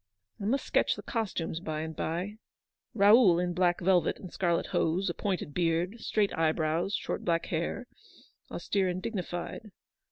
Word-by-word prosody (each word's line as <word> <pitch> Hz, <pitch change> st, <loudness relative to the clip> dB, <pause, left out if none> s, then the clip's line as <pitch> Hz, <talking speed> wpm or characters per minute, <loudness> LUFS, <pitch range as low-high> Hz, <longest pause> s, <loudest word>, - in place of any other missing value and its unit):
I 200 Hz, -, -5 dB
must 265 Hz, +6 st, 0 dB
sketch -, -, +2 dB
the -, -, -9 dB
costumes, 195 Hz, -9 st, -2 dB
by 155 Hz, -3 st, -4 dB
and 160 Hz, 0 st, -5 dB
by. 180 Hz, +8 st, -3 dB, 0.6 s
Raoul 205 Hz, -3 st, +6 dB
in 175 Hz, 0 st, 0 dB
black 175 Hz, 0 st, +2 dB
velvet 180 Hz, -1 st, +3 dB
and 185 Hz, -, -10 dB
scarlet 170 Hz, -3 st, +1 dB
hose, 175 Hz, +3 st, 0 dB
a -, -, -6 dB
pointed 180 Hz, -6 st, -3 dB
beard, 175 Hz, +6 st, 0 dB
straight 210 Hz, -2 st, 0 dB
eye 160 Hz, -1 st, +2 dB
brows, 160 Hz, +5 st, 0 dB
short -, -, -3 dB
black 170 Hz, -1 st, +1 dB
hair, 170 Hz, +9 st, -2 dB, 0.3 s
— -, -, -29 dB
austere 195 Hz, -2 st, 0 dB
and 180 Hz, 0 st, -2 dB
dignified. 185 Hz, +1 st, -5 dB
180 Hz, 165 wpm, -30 LUFS, 165-200 Hz, 0.6 s, Raoul